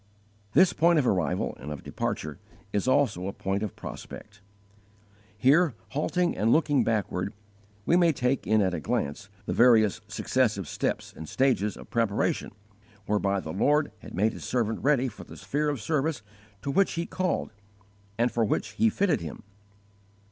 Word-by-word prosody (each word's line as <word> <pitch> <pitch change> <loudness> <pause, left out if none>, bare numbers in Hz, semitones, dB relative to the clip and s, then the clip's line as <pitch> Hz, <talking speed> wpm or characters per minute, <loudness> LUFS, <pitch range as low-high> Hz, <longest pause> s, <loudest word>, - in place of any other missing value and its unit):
This 185 -1 +5
point 170 +1 +4
of 145 - +3
arrival 90 - 0
and 75 +4 -7
of 75 - -7
departure 75 -2 -4 0.3
is 105 +4 0
also 125 -9 +2
a - - -2
point 95 +1 -2
of 105 -3 -4
prospect. 105 -1 -9 1.0
Here, 140 +5 +4
halting 175 +5 0
and 110 +2 +2
looking 145 -2 +3
backward, 100 -4 -1 0.5
we 170 - +3
may 175 -2 +5
take 125 -2 -1
in 110 -1 +4
at 95 -1 0
a 85 - -2
glance 75 +6 -2 0.2
the - - -2
various 110 -3 +5
successive 110 - 0
steps - - -2
and 80 -2 -8
stages 125 -6 +1
of - - -13
preparation 115 -4 0 0.6
whereby 100 -2 +1
the 80 - -6
Lord 145 +9 +2
had - - -10
made 105 +4 +2
His - - -9
servant 115 -3 -1
ready 135 -2 +3
for 110 - -9
the - - -12
sphere 150 +1 -1
of 145 -3 -2
service 150 +1 -1 0.4
to 140 - -1
which 195 +7 +2
He 170 0 -2
called, 185 0 -2 0.7
and 120 +1 +2
for 115 - +1
which 105 - 0
He 225 - +2
fitted 200 - +1
him. 85 +6 -7
115 Hz, 165 wpm, -27 LUFS, 100-145 Hz, 1.0 s, This